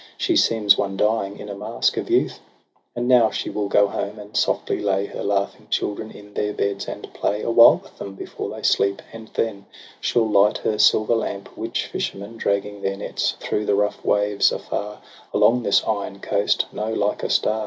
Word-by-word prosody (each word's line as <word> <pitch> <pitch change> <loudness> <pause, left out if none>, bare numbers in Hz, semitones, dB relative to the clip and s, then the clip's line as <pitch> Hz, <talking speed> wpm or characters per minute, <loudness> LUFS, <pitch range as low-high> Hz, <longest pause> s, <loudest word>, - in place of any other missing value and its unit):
She 350 - +1
seems 105 - +4
one 95 -1 -2
dying 105 -1 0
in - - -9
a 100 - -5
mask 100 - -1
of - - -4
youth. - - +1 0.6
And 120 0 -2
now 125 -3 +5
she - - -4
will 105 -1 -2
go 100 +1 +4
home, 100 +1 -4
and 105 0 -11
softly - - 0
lay 100 -1 +1
Her - - -6
laughing 100 0 -1
children 110 +1 -2
in 105 -1 -14
their 105 0 -1
beds, 100 -1 -2
and - - -8
play 105 +1 -1
Awhile 115 0 +6
with - - -19
them 100 -1 -7
before - - -6
they - - -8
sleep; 100 0 +2
and 110 -1 -10
then 100 -3 -2 0.3
She'll 115 -2 +1
light 105 0 +4
her 105 - -2
silver 110 +2 +4
lamp, 100 -3 -3
which - - -3
fishermen 100 +4 -5
Dragging 100 -1 -1
their 95 0 -2
nets 100 - -2
through 105 - -2
the 100 - +3
rough 105 +1 -1
waves, 105 0 +2
afar, 105 +1 -5 0.3
Along 125 +2 +4
this 100 - +3
iron 100 -2 -3
coast, 100 +1 +1
know 110 +1 -3
like 105 -2 -1
a - - -2
star. 110 +1 +2
105 Hz, 195 wpm, -22 LUFS, 100-110 Hz, 0.6 s, Awhile